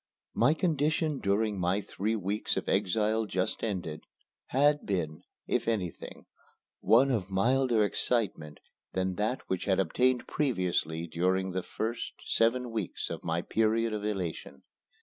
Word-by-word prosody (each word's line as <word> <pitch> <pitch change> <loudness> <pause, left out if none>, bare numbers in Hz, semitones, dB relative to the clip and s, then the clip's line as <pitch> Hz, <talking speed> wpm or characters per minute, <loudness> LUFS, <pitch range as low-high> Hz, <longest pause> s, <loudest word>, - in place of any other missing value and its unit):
My 140 +7 +4
condition 155 -2 +1
during 100 0 +1
my 90 +3 +1
three 105 +2 -2
weeks 105 +1 -1
of - - -3
exile 110 +3 +1
just 95 -2 -2
ended, 90 -8 -3 0.5
had 145 +3 +3
been, 80 -6 -2 0.2
if - - -1
anything, 100 -7 -3 0.5
one 130 +4 +5
of 100 -6 -1
milder 115 +3 +3
excitement 100 -10 -1 0.3
than 95 0 0
that 110 +5 0
which 95 -1 -2
had 95 -1 +2
obtained 125 +5 +2
previously 90 - 0
during 95 +3 0
the 95 +1 -1
first 115 +5 -4
seven 120 +2 +1
weeks 110 -6 -3
of - - -5
my 85 +1 -1
period 115 +1 +1
of 105 -1 -3
elation. 90 -9 -4
105 Hz, 135 wpm, -30 LUFS, 95-120 Hz, 0.5 s, one